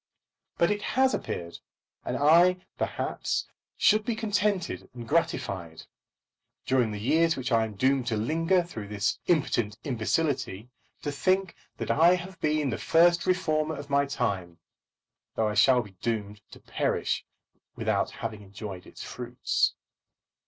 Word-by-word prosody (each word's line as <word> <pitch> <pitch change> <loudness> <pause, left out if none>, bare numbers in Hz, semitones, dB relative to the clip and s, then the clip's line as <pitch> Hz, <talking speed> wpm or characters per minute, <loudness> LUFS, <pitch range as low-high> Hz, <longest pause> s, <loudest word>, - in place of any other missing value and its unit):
But 170 - +3
it 205 0 -1
has 265 +4 +2
appeared; 85 0 -4 0.4
and - - -2
I 175 +5 +5
perhaps - - -2 0.3
should 215 0 +4
be 230 +1 -1
contented 205 -4 -1
and 120 -2 -8
gratified, 95 - -1 0.8
during 130 -3 +2
the 105 -1 -5
years 160 +8 +2
which 130 0 -3
I 115 -1 +4
am 110 -2 -8
doomed 130 +3 +2
to 110 -3 0
linger 165 - +2
through 105 -11 -7 0.3
impotent 120 -10 +1
imbecility, 125 -3 -1 0.3
to 145 - -2
think 185 +5 +1 0.2
that - - -2
I 170 +4 +5
have 180 0 -8
been 150 -3 +1
the 115 - -3
first 170 +1 +4
reformer 160 -4 +1
of 145 0 -9
my 140 0 +3
time, 95 -10 -2 0.8
though 110 - +1
I - - -2
shall 125 +2 +5
be 100 - -13
doomed 105 -3 -3
to - - -13
perish - - -1 0.5
without - - 0
having 110 -2 -6
enjoyed 100 -2 -8
its - - -10
fruits. 125 0 -1
140 Hz, 140 wpm, -28 LUFS, 110-170 Hz, 0.8 s, I